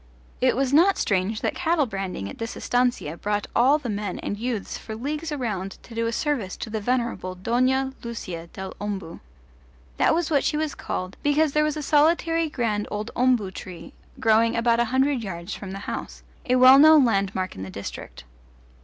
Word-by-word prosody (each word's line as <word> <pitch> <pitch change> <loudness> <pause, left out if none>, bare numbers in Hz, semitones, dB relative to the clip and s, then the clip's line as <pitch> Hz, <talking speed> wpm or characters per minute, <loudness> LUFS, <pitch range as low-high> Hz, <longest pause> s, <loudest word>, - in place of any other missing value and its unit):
It 255 0 +3
was 270 +1 0
not 360 +6 +5
strange 200 +3 0
that - - 0
cattle 330 -4 +1
branding 195 - -4
at 100 - -9
this 225 0 -5
estancia 245 -10 0
brought 205 +1 -1
all 265 +5 +5
the 290 -5 -7
men 205 -3 -3
and - - -4
youths 225 -1 -3
for 220 - -7
leagues 300 +7 -4
around 210 -9 -3
to 235 - -13
do 230 0 -1
a - - -1
service 240 -8 -2
to 220 - -6
the 220 -1 -2
venerable 235 -5 -1
Dona 255 +7 +1
Lucia 185 -8 -6
del 190 +2 -8
Ombu. 195 -5 -5 0.8
That - - +3
was 335 -1 -1
what 285 -3 +3
she 300 - 0
was 310 -1 -1
called, 185 +1 -5
because 290 +1 +2
there 300 +1 +2
was 305 0 -1
a 300 - -4
solitary 330 +2 +2
grand 220 -6 -1
old 210 +2 -4
ombu 245 -6 +2
tree 170 -3 -9 0.3
growing 225 +1 +3
about 230 0 +2
a 240 - +3
hundred 265 +2 +1
yards 175 -1 -6
from 200 - -7
the 195 - -5
house - - -6 0.3
a 250 - +4
well 255 +2 +8
known 310 -2 +8
landmark 195 -4 0
in 95 - -8
the 95 - -6
district. 100 -9 -8
235 Hz, 190 wpm, -24 LUFS, 195-280 Hz, 0.8 s, well